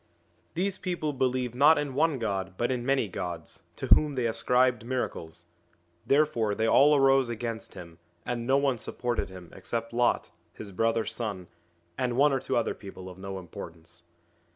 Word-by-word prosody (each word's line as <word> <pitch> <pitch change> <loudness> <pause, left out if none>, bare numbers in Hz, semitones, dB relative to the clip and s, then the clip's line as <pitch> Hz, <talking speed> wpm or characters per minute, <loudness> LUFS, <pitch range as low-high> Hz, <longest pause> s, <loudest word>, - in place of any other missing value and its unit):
These 190 +2 -1
people 175 -5 -2
believed 130 -2 0
not 145 +5 +6
in 145 -2 -2
one 155 +1 +2
God 95 -5 -3
but 120 +2 0
in 125 -2 -2
many 135 -3 +1
gods, 90 -3 -6
to - - -5
whom 150 -2 +5
they 125 -2 0
ascribed 125 +1 +2
miracles; 85 -10 -4 0.6
therefore 135 -8 +2
they 110 - 0
all 145 +6 +6
arose 135 -2 +4
against 115 -1 -5
him, 85 -1 -11 0.3
and 120 -1 -3
no 135 +1 +4
one 135 -4 +1
supported 120 -2 -2
him 90 -2 -11
except 115 +5 -4
Lot, 120 0 +1 0.2
his 105 -2 -9
brother's 115 +2 0
son, 105 -6 -4 0.5
and 125 -1 0
one 145 +1 +5
or 135 - +1
two - - -1
other 115 - 0
people 95 -2 -10
of 90 - -14
no 95 0 -6
importance. 85 -2 -10
120 Hz, 170 wpm, -28 LUFS, 100-135 Hz, 0.6 s, not